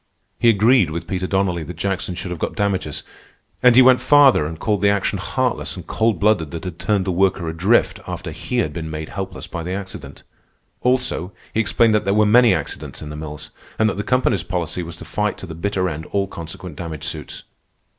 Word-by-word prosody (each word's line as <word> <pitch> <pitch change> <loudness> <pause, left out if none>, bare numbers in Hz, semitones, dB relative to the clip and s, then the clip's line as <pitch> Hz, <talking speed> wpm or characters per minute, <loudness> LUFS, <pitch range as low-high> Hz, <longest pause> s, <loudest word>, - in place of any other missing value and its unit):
He 120 - +5
agreed 110 -2 +4
with 85 +1 -4
Peter 95 +1 -2
Donnelly 95 -3 0
that 80 +3 -7
Jackson 95 +1 -2
should 90 0 -5
have 90 - -5
got - - -3
damages, 95 -8 -1 0.6
and 125 -1 +6
he 130 - +9
went 130 0 +6
farther 140 - +5
and 80 +1 -6
called 105 +2 0
the 100 - +4
action 100 -1 0
heartless - - -1
and - - -9
cold 110 -1 0
blooded 100 -7 +2
that 85 +3 -6
had 90 -3 -6
turned 100 -3 +1
the 95 - 0
worker 95 -1 +1
adrift 90 +8 +2
after - - -5
he - - -4
had 75 - 0
been 80 0 -5
made 80 0 -5
helpless 95 -2 -6
by 85 - -6
the 90 +3 -4
accident. 95 -1 -7 0.6
Also, 125 -8 0 0.2
he - - 0
explained 115 +1 +3
that 105 - +2
there 100 +1 +1
were 105 0 +4
many 120 +3 +6
accidents - - -4
in 75 - -7
the - - -6
mills, 75 -1 -8 0.3
and 110 - +3
that 100 - -1
the - - 0
company's 125 -5 +1
policy 90 0 -3
was 85 0 -7
to - - -11
fight 105 0 -1
to - - -8
the 85 - -8
bitter 95 +2 -1
end 80 -2 -5
all 100 -1 0
consequent 90 -1 -8
damage 80 -4 -6
suits. - - -6
95 Hz, 215 wpm, -21 LUFS, 85-105 Hz, 0.6 s, he